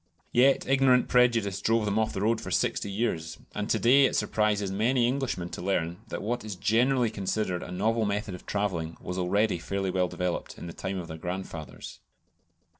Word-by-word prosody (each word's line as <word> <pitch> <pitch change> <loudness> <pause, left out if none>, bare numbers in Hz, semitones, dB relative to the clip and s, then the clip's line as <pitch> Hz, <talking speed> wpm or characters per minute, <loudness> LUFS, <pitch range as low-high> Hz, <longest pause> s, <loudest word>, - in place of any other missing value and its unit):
Yet 135 +3 +4
ignorant 130 -2 +4
prejudice 115 -6 +3
drove 115 0 +2
them 105 +1 +1
off 110 - +1
the 95 - -4
road 110 +2 +1
for - - -6
sixty - - 0
years; 85 -7 -2 0.2
and 105 0 -3
to - - +3
day 135 +4 +5
it - - 0
surprises 105 -2 +1
many 120 +5 +2
Englishmen 125 -9 -2
to - - -7
learn 85 -2 -1
that - - -5
what 120 +2 -2
is 105 -3 -5
generally 115 +4 +2
considered 95 -2 -2
a - - -7
novel 110 +5 +1
method 105 0 -2
of 90 - -10
travelling 90 -6 -2
was 90 +1 -5
already 100 +1 +1
fairly 95 +2 -2
well 90 0 +1
developed 90 0 -3
in - - -8
the 85 - -7
time 95 0 -4
of 90 -2 -5
their 80 -1 -7
grandfathers. 90 -3 -6
105 Hz, 190 wpm, -28 LUFS, 90-115 Hz, 0.2 s, day